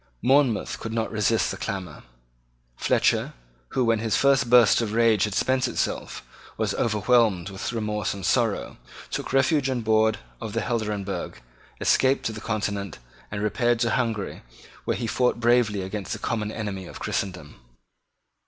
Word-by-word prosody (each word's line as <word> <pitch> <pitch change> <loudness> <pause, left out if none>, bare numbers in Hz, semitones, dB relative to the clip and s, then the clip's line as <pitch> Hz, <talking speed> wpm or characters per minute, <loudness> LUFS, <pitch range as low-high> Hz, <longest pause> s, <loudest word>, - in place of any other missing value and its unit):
Monmouth 130 -3 +2
could 115 - -5
not 115 -1 -1
resist 110 +1 +1
the - - -5
clamour. 95 -2 -5 0.7
Fletcher, - - +1 0.4
who, 130 - +2
when 115 -1 +2
his 110 -1 0
first 140 -2 +3
burst 120 -2 +6
of 110 -2 -2
rage 115 -3 +4
had 105 -2 -4
spent 130 0 +1
itself, - - -3 0.3
was - - 0
overwhelmed 105 -4 +2
with 95 +5 -4
remorse 105 -3 -2
and 100 -1 -5
sorrow, 115 -2 0 0.3
took - - -4
refuge 135 +1 +2
on 130 -2 -1
board 110 0 +3 0.2
of 105 - -5
the 115 - 0
Helderenbergh, 105 -5 -3 0.4
escaped 135 +1 +2
to - - 0
the 110 -1 -8
Continent, 100 -4 -3 0.3
and 100 0 -4
repaired 120 +3 +1
to 120 -1 +2
Hungary, 115 -5 -2 0.4
where - - 0
he 120 - -3
fought 125 +1 +1
bravely 115 -4 +2
against 95 0 -4
the - - -4
common 110 -3 -2
enemy 100 -4 -5
of - - -10
Christendom. 90 -8 -4
110 Hz, 155 wpm, -25 LUFS, 105-120 Hz, 0.7 s, burst